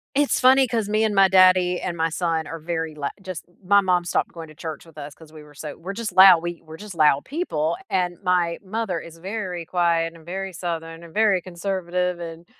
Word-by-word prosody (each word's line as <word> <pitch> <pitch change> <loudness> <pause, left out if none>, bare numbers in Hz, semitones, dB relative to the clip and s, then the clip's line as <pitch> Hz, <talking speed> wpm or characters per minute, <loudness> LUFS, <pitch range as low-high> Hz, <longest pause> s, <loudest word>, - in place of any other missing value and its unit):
It's 285 0 +2
funny 260 +1 +5
'cause 225 -3 -1
me 215 +1 +1
and 215 -2 0
my 195 0 +6
daddy 185 -1 +4
and 175 -2 -4
my 165 0 +1
son 165 -1 -1
are 165 - -7
very 160 0 -3
lou 145 -2 -4 0.2
just 185 -3 -7 0.2
my 200 +2 +5
mom 180 -2 +1
stopped 175 - -1
going 165 -1 -9
to 155 - -14
church 160 +1 -7
with 165 -2 -18
us 145 -1 -9
'cause 160 -1 -17
we 155 - -11
were 150 -1 -17
so 150 0 -7
we're 185 +4 -7
just 220 0 -4
loud 185 -3 +8
we 175 -1 -5
we're 160 0 -11
just 210 0 -9
loud 150 -4 +3
people, 170 - -2
and 180 -2 -1
my 180 -3 +1
mother 200 -3 -3
is 165 0 -12
very 185 -2 -5
quiet, 170 -1 +1
and 165 -1 -16
very 190 +2 -5
southern, 165 -1 -5
and 165 - -13
very 210 -4 +3
conservative, 180 0 -3
and 165 0 -8
175 Hz, 225 wpm, -23 LUFS, 165-190 Hz, 0.2 s, loud